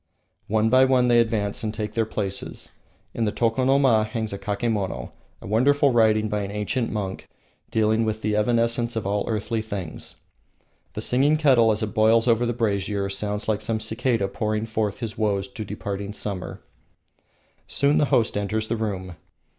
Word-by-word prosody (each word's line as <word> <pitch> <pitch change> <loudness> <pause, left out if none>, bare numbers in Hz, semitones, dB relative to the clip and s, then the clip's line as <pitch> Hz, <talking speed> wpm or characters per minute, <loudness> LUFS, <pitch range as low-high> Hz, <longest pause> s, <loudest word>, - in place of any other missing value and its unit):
One 110 +1 +2
by 130 +1 +6
one 130 -2 +3
they 120 -1 +5
advance 110 -3 0
and 110 - -1
take 105 -1 -5
their 115 -1 0
places. 100 -3 -4 0.4
In 115 - -1
the 105 - 0
tokonoma 125 0 +3
hangs 110 -1 -3
a 100 - -5
kakemon, 100 - -2 0.3
a - - -9
wonderful 140 +7 +3
writing 110 -2 +3
by 105 -1 -1
an 100 - -4
ancient 105 +4 -2
monk 100 -3 -4 0.4
dealing 110 +1 +2
with 110 0 -2
the 105 0 0
evanescence 115 +2 +1
of 110 - -2
all 100 +1 0
earthly 110 +1 -1
things. 100 -7 -7 0.8
The - - -4
singing 140 +5 +3
kettle, 130 -7 +4
as 110 +1 -1
it 105 - -3
boils 110 +2 +4
over 120 0 +3
the - - +1
brazier, 100 -3 -1
sounds 105 +2 -3
like 110 -1 0
some 110 0 -1
cicada 110 -1 0
pouring 105 +2 -2
forth 110 0 -2
his 110 -3 -5
woes 100 -2 0
to 110 - -6
departing 100 0 -5
summer. 100 -3 -5 1.0
Soon 140 +1 +2
the 150 - +4
host 115 -5 +1
enters 110 +2 -1
the 115 - 0
room. 95 -5 -4
110 Hz, 170 wpm, -24 LUFS, 105-115 Hz, 1.0 s, by